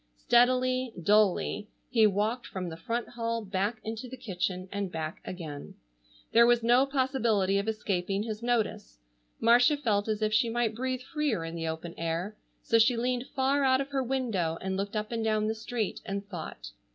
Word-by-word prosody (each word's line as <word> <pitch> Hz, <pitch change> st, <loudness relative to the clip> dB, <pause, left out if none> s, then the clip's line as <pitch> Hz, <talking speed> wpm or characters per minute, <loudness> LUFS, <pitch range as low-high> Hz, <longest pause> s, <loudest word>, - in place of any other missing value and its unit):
Steadily, 255 Hz, -, +3 dB
dully, 205 Hz, +2 st, +2 dB, 0.2 s
he 225 Hz, -4 st, +5 dB
walked 210 Hz, +5 st, -1 dB
from 185 Hz, -2 st, -4 dB
the 160 Hz, -, -7 dB
front 230 Hz, +8 st, -3 dB
hall 230 Hz, -2 st, -3 dB
back 200 Hz, +4 st, -1 dB
into 225 Hz, +3 st, -5 dB
the 260 Hz, -, -8 dB
kitchen 185 Hz, -5 st, -3 dB
and 200 Hz, -2 st, -3 dB
back 160 Hz, -1 st, -5 dB
again. 155 Hz, -6 st, -7 dB, 0.6 s
There 235 Hz, +1 st, +6 dB
was 240 Hz, -1 st, +4 dB
no 245 Hz, +4 st, +4 dB
possibility 235 Hz, -8 st, +1 dB
of 200 Hz, -, -3 dB
escaping 200 Hz, -2 st, -1 dB
his 215 Hz, -1 st, -5 dB
notice. 225 Hz, -, -1 dB, 0.4 s
Marcia 245 Hz, +5 st, +5 dB
felt 215 Hz, -7 st, 0 dB
as 215 Hz, 0 st, -1 dB
if 215 Hz, 0 st, +1 dB
she 230 Hz, +2 st, +3 dB
might 230 Hz, -1 st, 0 dB
breathe 255 Hz, +2 st, -2 dB
freer 285 Hz, -, -1 dB
in 165 Hz, -, -6 dB
the 165 Hz, -1 st, -3 dB
open 160 Hz, +1 st, -5 dB
air, 170 Hz, +5 st, -2 dB, 0.3 s
so 230 Hz, -, +3 dB
she 235 Hz, +2 st, +4 dB
leaned 250 Hz, +2 st, -1 dB
far 275 Hz, +2 st, +2 dB
out 260 Hz, -1 st, +4 dB
of 275 Hz, 0 st, -3 dB
her 275 Hz, -1 st, 0 dB
window 230 Hz, -11 st, -1 dB
and 190 Hz, 0 st, -3 dB
looked 200 Hz, +2 st, -3 dB
up 215 Hz, +1 st, -2 dB
and 230 Hz, -1 st, -1 dB
down 215 Hz, -1 st, +1 dB
the 220 Hz, -, 0 dB
street, 225 Hz, -1 st, -3 dB
and 200 Hz, +1 st, -4 dB
thought. 155 Hz, -, -7 dB
220 Hz, 185 wpm, -29 LUFS, 190-245 Hz, 0.6 s, There